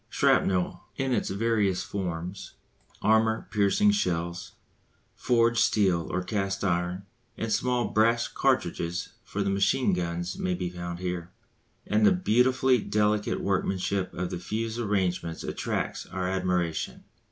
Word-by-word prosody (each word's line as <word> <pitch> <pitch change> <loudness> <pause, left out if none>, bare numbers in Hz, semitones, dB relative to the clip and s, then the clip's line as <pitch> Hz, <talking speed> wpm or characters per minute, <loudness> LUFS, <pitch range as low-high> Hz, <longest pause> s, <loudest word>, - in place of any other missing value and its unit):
Shrapnel 90 -2 +2
in 135 -1 -1
its - - 0
various 100 -2 +1
forms, 90 -1 -5 0.5
armour 110 +1 +3
piercing 105 - +3
shells, 85 - -2 0.6
forged 115 -1 +2
steel 95 -8 +2
or 95 - -1
cast 95 0 -2
iron, 90 +1 -1 0.3
and 110 -1 -1
small 125 -1 +1
brass 115 +2 +3
cartridges 85 +1 0
for 105 - -3
the 100 - 0
machine 100 +7 +2
guns 85 0 -3
may 90 -1 0
be 90 -1 -3
found 85 -1 -5
here; 90 -1 -4 0.6
and 105 +1 +1
the - - +7
beautifully 130 -5 +3
delicate 105 0 0
workmanship 95 0 -1
of 90 +1 -3
the - - -3
fuse 115 +4 -3
arrangements 90 -6 -1
attracts - - -3
our 90 0 -3
admiration. 90 -3 -1
95 Hz, 130 wpm, -27 LUFS, 90-110 Hz, 0.6 s, the